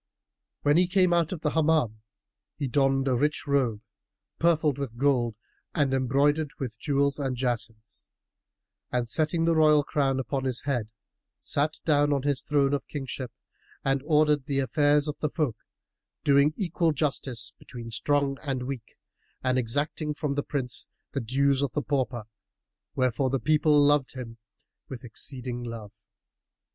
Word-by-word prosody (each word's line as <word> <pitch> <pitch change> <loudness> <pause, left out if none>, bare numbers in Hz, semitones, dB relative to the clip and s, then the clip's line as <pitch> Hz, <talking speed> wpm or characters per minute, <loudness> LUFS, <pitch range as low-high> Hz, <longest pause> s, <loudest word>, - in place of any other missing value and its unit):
When 145 +2 +4
he 180 0 +4
came 185 -1 +3
out 170 -2 +2
of 175 -4 -5
the 150 - 0
Hammam, 155 -9 +1 0.6
he 145 - -2
donned 135 0 +2
a 130 - +2
rich 145 +3 0
robe, 130 -7 +1 0.6
purfled 155 -4 +2
with 125 -5 -5
gold 125 -4 +2 0.4
and 145 -5 +2
embroidered 140 +4 +2
with 115 -5 -5
jewels 140 -1 +1
and 135 -2 -1
jacinths; 115 -3 -4 0.8
and, 125 -1 0
setting 160 +6 +2
the 165 0 +3
royal 155 -2 +5
crown 135 -2 0
on 135 -2 -1
his 130 -2 0
head, 120 -6 -2 0.5
sat 150 +2 +1
down 145 -2 +3
on 140 -2 -1
his 140 -2 +1
throne 145 -2 +1
of 140 - -2
kingship 135 -3 -5 0.5
and 135 0 +2
ordered 150 -2 +2
the 140 - -1
affairs 145 +2 +2
of 150 - -4
the 150 - 0
folk, 145 -8 -1 0.7
doing 140 +2 +4
equal 170 -4 +1
justice 135 -5 -2
between 120 -2 -9
strong 140 +3 0
and 135 -4 -2
weak, 125 -3 -7 0.5
and 130 0 +2
exacting 145 +5 -1
from 150 -2 -2
the 145 - 0
prince 130 -4 -2 0.2
the 140 - -2
dues 135 +3 +1
of 140 -4 -1
the 150 - -1
pauper; 130 -5 -1 0.7
wherefore 130 +1 +1
the 135 +1 0
people 150 +3 +3
loved 145 -2 +3
him 115 -3 -8 0.5
with 125 -3 -7
exceeding 125 +1 -4
love. 115 -3 -7
140 Hz, 155 wpm, -27 LUFS, 125-150 Hz, 0.8 s, royal